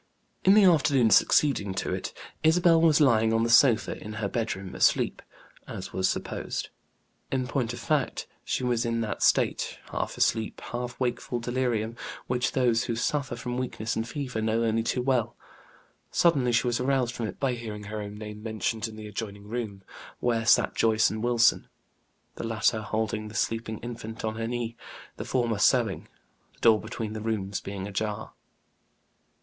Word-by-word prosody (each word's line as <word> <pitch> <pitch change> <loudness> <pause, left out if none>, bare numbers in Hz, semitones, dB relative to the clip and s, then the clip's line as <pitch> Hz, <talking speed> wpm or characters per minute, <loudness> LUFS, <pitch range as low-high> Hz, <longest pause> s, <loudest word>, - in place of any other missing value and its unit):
In 195 - +6
the 215 - +7
afternoon 140 - +4
succeeding 105 -10 +3
to - - -2
it, - - -4 0.3
Isabel 165 +1 +5
was 160 -2 +5
lying 115 -6 +4
on 115 0 +2
the 115 - +1
sofa 120 -1 +4
in 105 - -7
her 110 -2 -2
bedroom, 100 -4 -3
asleep, - - +2 0.5
as - - -7
was 95 0 +1
supposed. - - -3 0.6
In 130 -1 0
point 125 -2 -1
of 120 - -6
fact, 150 -4 -1 0.2
she - - -2
was 120 -2 +1
in 115 0 -1
that 110 -3 -3
state, - - +2
half - - -3
asleep, 110 -1 +1
half 120 0 -4
wakeful 120 -1 -2
delirium, 120 -2 -1 0.3
which 125 0 0
those 120 -3 +2
who 115 - -2
suffer 130 +1 -1
from 125 +1 -4
weakness 110 -3 -3
and 115 +1 -2
fever 130 -5 -4
know 110 +1 +1
only 115 0 +1
too 125 +2 -1
well. 125 -4 +1 0.7
Suddenly 140 -8 +3
she 120 +2 +2
was 120 -1 0
aroused 130 -2 +1
from 115 -3 -3
it - - -8
by 135 -2 +1
hearing 110 -3 -6
her 105 +1 -5
own 105 0 -7
name 105 0 -8
mentioned 110 +1 -2
in 110 - -10
the 110 0 -8
adjoining 105 -1 -6
room, 105 -4 -5 0.4
where 115 -2 0
sat - - +5
Joyce 110 0 +3
and 110 +1 -4
Wilson, 120 -1 +3 0.7
the - - -5
latter 110 0 +1
holding 110 0 -2
the 105 - -10
sleeping 110 +1 -1
infant 115 -2 -6
on 110 - -1
her 115 0 -2
knee, 120 -1 -3 0.4
the - - -5
former 120 -5 0
sewing, 115 -3 +2 0.5
the - - -27
door 110 -2 +5
between 110 -2 -5
the 110 - -5
rooms 105 -3 -2
being 100 -1 -5
ajar. 105 +1 -3
115 Hz, 175 wpm, -27 LUFS, 110-125 Hz, 0.7 s, the